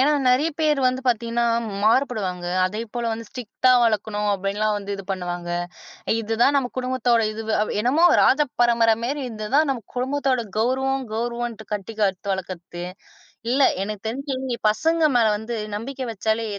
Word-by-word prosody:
ஏன்னா, 290 +3 +4 0.2
நிறைய 260 +6 +3
பேர் 300 -2 +3
வந்து 255 +1 0
பாத்தீங்கன்னா 235 0 +1 0.4
மாறுபடுவாங்க. 215 -7 +1 0.2
அதேப்போல 230 +4 -3
வந்து 225 +1 -5
ஸ்ரிக்ட்டா 250 +1 0
வளர்க்கணும், 210 -1 0
அப்படின்னுலாம் 200 +2 0
வந்து 200 0 -6
இது 195 - -7
பண்ணுவாங்க. 175 -2 -4 0.7
இதுதான் 225 +6 +2
நம்ம 270 -3 +2
குடும்பத்தோட 250 -2 +1
இதுவு. 220 0 -4 0.3
என்னமோ 255 +9 +2 0.2
ராஜ 275 - +4 0.2
பரம்பரை 230 -2 +4
மாரி. 280 +4 -2
இதுதான் 225 +8 +1
நம்ம 260 -4 -1
குடும்பத்தோட 260 -1 0
கௌரவம், 265 +4 +1
கௌரவம்னு 235 -1 -3
கட்டி 210 +2 -5
காத்து 195 -1 0
வளர்க்கறது. 180 -2 -6 0.7
இல்ல, 265 +3 +2 0.2
எனக்குத் 210 +1 -5
தெரிஞ்சு 260 0 -3
பசங்க 325 +9 +1
மேல 230 -2 +4
வந்து 220 +3 -6 0.2
நம்பிக்கை 260 +5 -5
வச்சாலே, 220 +1 -1
230 Hz, 140 wpm, -23 LUFS, 210-260 Hz, 0.7 s, ஏன்னா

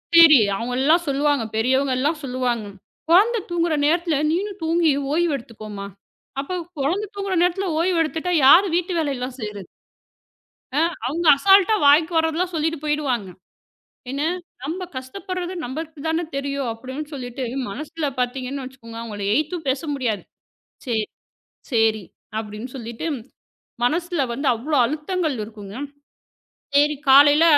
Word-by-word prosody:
சரி 320 -5 +9 0.2
அவங்க 235 +4 -3
எல்லாம் 330 +5 +4
சொல்லுவாங்க. 285 -2 +1
பெரியவங்க 260 +3 +2
எல்லாம் 305 +3 0
சொல்லுவாங்க. 250 -4 -1 0.4
குழந்தை 435 +7 +5
தூங்குற 340 -2 +1
நேரத்துல 335 0 +2 0.2
நீயும் 395 +3 -2
தூங்கி 325 -1 +3 0.2
ஓய்வு 335 +1 +2
எடுத்துக்கோமா, 215 -4 -9 0.6
அப்ப 365 +6 -4 0.2
குழந்தை 380 +9 0
தூங்குற 395 -2 -2
நேரத்துல 365 +1 0
ஓய்வு 345 0 +2
எடுத்துட்டா 325 +3 -2
யாரு 360 +8 +8
வீட்டு 360 +1 0
வேலை 290 -3 0
எல்லாம் 250 +1 -5
செய்யுறது. 210 -3 -6 1.4
அவுங்க 330 +5 -2
அசால்ட்டா 390 +5 +5
வாய்க்கு 315 +4 +5
வர்றதெல்லாம் 325 +3 +1
சொல்லிட்டு 320 0 0
போயிடுவாங்க. 275 -9 -1 0.8
ஏன்னாக்ஷ 320 +6 -2 0.2
நம்ம 345 +6 -3
கஷ்டப்படுறது 360 +7 -5
நமக்குத் 310 +3 -6
தான 325 +1 0
தெரியும், 275 -2 -2
அப்டின்னு 260 +6 -7
சொல்லிட்டு 255 -1 -5 0.3
மனசுல 305 +7 -5
பாத்தீங்கன்னு 260 +2 -2
வச்சுக்கோங்க. 230 -3 -11
அவுங்கள 210 -3 -6
ஏய்த்து 310 +6 0
பேச 265 +1 0
முடியாது. 235 -7 -2 0.6
செரி, 220 -3 0 0.7
செரி 220 -3 +2 0.4
அப்டின்னு 215 +3 -7
சொல்லிட்டு, 235 +5 -5 0.8
மனசுல 340 +4 0
வந்து 275 +4 -3
அவ்ளோ 285 +6 -2
அழுத்தங்கள் 305 +2 -1
இருக்குங்க. 205 -2 -10 1.0
செரி 295 +1 +4
காலையில 290 +3 +7
295 Hz, 125 wpm, -22 LUFS, 250-335 Hz, 1.4 s, சரி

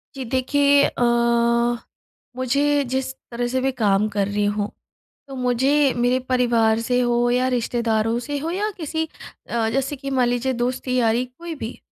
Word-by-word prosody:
जी 270 - -5
देखिए 280 +3 +3
अ, - - -2 1.3
मुझे 280 +3 +1
जिस 265 +1 -2 0.2
तरह 240 +1 -2
से 260 +1 -1
भी 270 - +1
काम 210 -4 +2
कर 200 -1 -1
रही 205 0 0
हूँ, 205 0 -1 0.6
तो 270 - -8
मुझे 265 +3 +2
मेरे 245 +1 +2
परिवार 235 -3 +2
से 245 +1 0
हो 240 0 +2
या 250 +1 +2
रिश्तेदारों 230 -2 0
से 285 +4 -4
हो 320 +4 -3
या 410 +4 -1
किसी 320 -1 -2 0.4
अ, 230 -1 0
जैसे 270 +4 -1
कि 275 0 -6
मान 255 -2 +2
लीजिए 245 +2 0
दोस्ती-यारी 250 -1 0
कोई 325 +6 -9
भी। 240 -3 -7
250 Hz, 160 wpm, -22 LUFS, 235-275 Hz, 1.3 s, देखिए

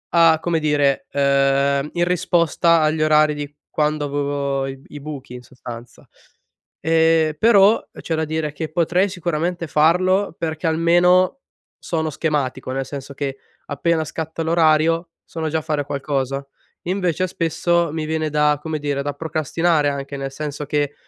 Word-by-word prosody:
a 165 -1 +6
come 170 -2 0
dire 145 -2 +1
ehm, 140 0 +2
in 175 - +1
risposta 170 -1 +2
agli 155 0 +1
orari 155 0 +4
di 145 -1 -6 0.2
quando 150 0 0
avevo 140 -1 -2
i 135 +2 -9
buchi 140 -4 -8
in 125 - -9
sostanza, 120 -2 -11 0.7
ehm, 160 -1 +3
però 215 -1 +5 0.2
c'è 165 - -3
da 160 0 -1
dire 155 -1 -2
che 155 +1 -5
potrei 175 +4 +1
sicuramente 175 -1 -2
farlo 180 +5 +2
perché 160 0 -3
almeno 175 +7 +3 0.4
sono 160 -2 -1
schematico, 140 -4 -2
nel 135 0 -2
senso 140 -1 -7
che 135 -1 -3 0.3
appena 160 +3 0
scatta 160 +1 -5
l'orario, 165 +1 +2 0.2
sono 160 -1 -4
già 160 - 0
a - - -7
fare 150 -2 -1
qualcosa. 140 -1 -2 0.4
Invece, 185 -1 -1
spesso, 170 0 0
mi 160 -1 -3
viene 155 0 -1
da 150 0 +2
come 160 -1 -3
dire, 145 -1 -2
da 145 - -2
procrastinare 155 +1 0
anche, 140 0 -5
nel 135 0 -4
senso 150 +1 -5
che, 145 0 -1
155 Hz, 150 wpm, -21 LUFS, 145-165 Hz, 0.7 s, a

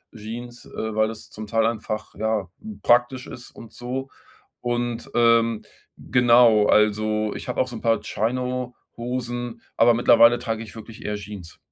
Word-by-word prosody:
Jeans, 120 +3 -8
äh, 110 -5 -5
weil 110 0 +2
es 110 -1 -10
zum 110 0 -8
Teil 115 +1 +1
einfach, 110 -2 -3
ja, 110 -2 -1 0.4
praktisch 120 +2 +3
ist 125 - -10
und 115 -1 -13
so 130 +2 -5 0.5
und, 120 -1 -2
ähm, 115 -1 +3 0.3
genau, 120 -4 +5
also 105 0 +2
ich - - -7
habe 125 - -3
auch 130 - 0
so 120 - -8
'n - - -10
paar 115 -2 +2
Chino 125 +3 -2 0.2
Hosen, 120 -1 -4 0.2
aber 120 +1 +6
mittlerweile 120 0 +6
trage 115 -2 -3
ich 110 - -12
wirklich 110 0 -11
eher 105 - -2
Jeans. 100 -4 -9
115 Hz, 160 wpm, -23 LUFS, 110-120 Hz, 0.5 s, aber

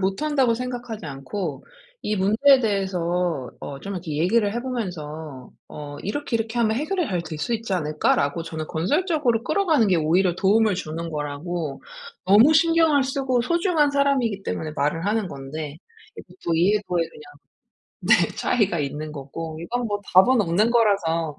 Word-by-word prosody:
못한다고 245 +5 +1
생각하지 245 -4 -5
않고 140 +2 -5 0.4
이 210 - -1
문제에 230 +8 +4
대해서 180 - -1
어 140 -1 -7
좀 200 +4 -6
이렇게 165 -5 -5
얘기를 200 +6 +2
해보면서 160 - -5 0.2
어 145 -1 -8
"이렇게, 240 +4 -2
이렇게 225 +1 -3
하면 220 -1 +2
해결이 345 +3 -1
잘 180 -3 -1
될 160 -2 -7
수 240 - -2
있지 225 -2 -4
않을까?"라고 150 -1 0
저는 160 -1 -6
건설적으로 250 - 0
끌어가는 310 - +2
게 185 - +3
오히려 170 +3 +2
도움을 210 +2 +3
주는 165 -1 -5
거라고 150 +1 -4 0.4
너무 220 +10 +7
신경을 325 -3 +4
쓰고 265 -2 0
소중한 340 -1 +2
사람이기 270 -8 +1
때문에 155 -5 -4
말을 150 +5 0
하는 210 -2 0
건데 140 +2 -7 0.4
예 - - -7
보통 170 - -4
이해도에 180 -1 +2
그냥 160 - -14 0.8
네 - - +3
차이가 200 -7 +1
있는 150 +1 -4
거고 155 +3 -7
이건 240 +8 -3
뭐 205 -1 -2
답은 225 +6 +6
없는 200 +5 +2
거라서 170 -9 +1
195 Hz, 350 characters per minute, -23 LUFS, 160-240 Hz, 0.8 s, 너무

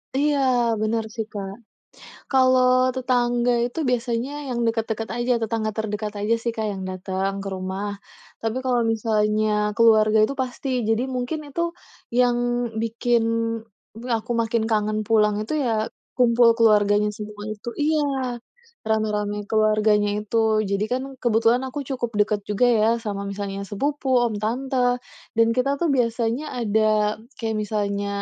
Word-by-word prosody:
Iya, 290 0 +2 0.4
benar 225 +1 0
sih 225 - -2
Kak. 195 -2 -5 0.8
Kalau 255 -1 +4 0.3
tetangga 245 -1 +1
itu 245 +6 -7
biasanya 240 +1 -1 0.2
yang 245 -2 -2
deket-deket 225 0 -1
aja, 240 +1 +1
tetangga 220 -1 -1
terdekat 210 -1 -3
aja 210 +3 +2
sih - - -2
Kak 220 - -2
yang 190 -1 -6
dateng 190 +1 -2
ke - - -4
rumah. 190 +2 -4 0.5
Tapi 225 +1 -2
kalau 250 -2 +2
misalnya 215 -1 +1 0.3
keluarga 220 -2 +5
itu 245 - -1
pasti. 255 +2 -5 0.2
Jadi 225 +2 +2
mungkin 250 +5 -2
itu, 285 +4 -4 0.6
yang 245 -1 +4 0.5
bikin 230 +1 +1 0.8
b - - -11
aku 225 +2 -8
makin 230 0 0
kangen 215 0 +1
pulang 210 -2 +4
itu 215 - -5
ya 220 -2 0 0.3
kumpul 240 -1 +5
keluarganya 210 -2 +4
semua 210 0 -8
itu 215 +2 -7
iya, 280 -5 0 0.5
rame-rame 210 -1 0
keluarganya 215 -1 +3
itu. 215 +2 -4 0.3
Jadi 200 +1 +1
kan 255 +1 0 0.2
kebetulan 230 +1 +3
aku 290 - -5
cukup 250 -4 -2
dekat 210 0 +2
juga 210 +4 +2
ya 220 -2 +3 0.2
sama 200 -1 -3
misalnya 200 0 -4
sepupu, 280 +6 -2 0.2
om, 220 - -5
tante. 245 +2 0 0.4
Dan 230 0 +4
kita 255 +2 +2
tuh 340 - +1
biasanya 235 +1 0 0.2
ada, 215 -1 +2 0.2
kayak 225 -2 -1
misalnya 205 -1 -2
225 Hz, 140 wpm, -23 LUFS, 210-245 Hz, 0.8 s, keluarga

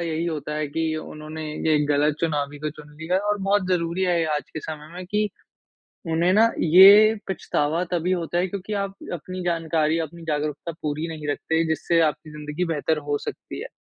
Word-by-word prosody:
यही 165 -1 -2
होता 150 -2 -3
है 150 -1 -1
कि 160 +1 -1
उन्होंने 155 0 -7 0.2
ये 155 -1 +4
गलत 145 +1 +2
चुनावी 145 -3 -1
को 150 +1 -3
चुन 150 0 -14
लिया 180 +4 +1
और 210 - +1
बहुत 195 -1 +1
ज़रूरी 170 0 0
है 175 -2 +2
ये 165 - +1
आज 150 -3 -4
के 155 - -6
समय 155 0 -7
में 180 +1 -6
कि, 210 +2 0 0.8
उन्हें 170 +3 +3
ना 225 +3 +5
ये 200 +6 +8
पछतावा 160 -2 0
तभी 175 +1 0
होता 175 -1 -1
है 180 - +2
क्योंकि 200 +2 -6
आप 195 0 -3 0.2
अपनी 185 +2 -5
जानकारी, 165 -2 +1
अपनी 165 +1 -5
जागरूकता 150 +1 -2
पूरी 150 +2 -2
नहीं 155 -2 -6
रखते, 160 +3 0
जिससे 165 +2 +1
आपकी 155 0 0
ज़िंदगी 150 +3 -4
बेहतर 160 -1 0
हो 145 - +2
सकती - - -7
है - - -5
160 Hz, 190 wpm, -24 LUFS, 150-180 Hz, 0.8 s, ये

